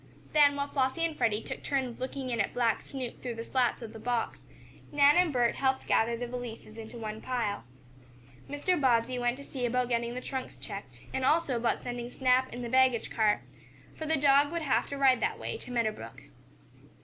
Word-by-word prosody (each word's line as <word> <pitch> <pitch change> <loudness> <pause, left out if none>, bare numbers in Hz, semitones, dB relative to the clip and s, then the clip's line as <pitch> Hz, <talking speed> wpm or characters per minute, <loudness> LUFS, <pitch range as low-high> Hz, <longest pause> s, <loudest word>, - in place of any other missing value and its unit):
Then, 290 -2 +6
while 280 0 -1
Flossie 280 +4 +1
and 325 -2 -2
Freddie 220 -4 +1
took - - -6
turns 260 -4 -2
looking 260 0 -4
in 230 -2 +1
at 200 - -2
black 235 -3 +2
Snoop 260 -3 -6
through 245 -2 -4
the 230 - -5
slats 250 0 0
of 220 - -8
the 225 - -9
box, 240 0 -2 0.4
Nan 290 0 +6
and 355 -2 +4
Bert 245 -3 +2
helped 265 -1 +1
gather 235 +1 +2
the 245 - -3
valises 235 -3 -7
into 225 +1 -8
one 220 -1 -5
pile. 225 - -2 0.8
Mr. 295 +4 0
Bobbsey 250 -1 +2
went 245 +1 0
to 280 - -9
see 265 -2 -6
about 250 +1 +1
getting 235 0 -1
the - - -2
trunks 260 0 -5
checked, 130 - -8
and 265 - -1
also 295 -1 +3
about 235 -1 0
sending 240 -1 -4
Snap 255 0 +2
in 245 - -6
the - - -3
baggage 255 -2 +3
car, 215 -2 +2 0.5
for 315 - -5
the 320 0 +2
dog 285 0 +4
would 335 -1 -2
have 275 - +1
to 280 - -5
ride 265 -3 +4
that - - 0
way - - -4
to 445 - -10
Meadow 235 -3 +1
Brook. 115 - -10
250 Hz, 210 wpm, -30 LUFS, 235-275 Hz, 0.8 s, Then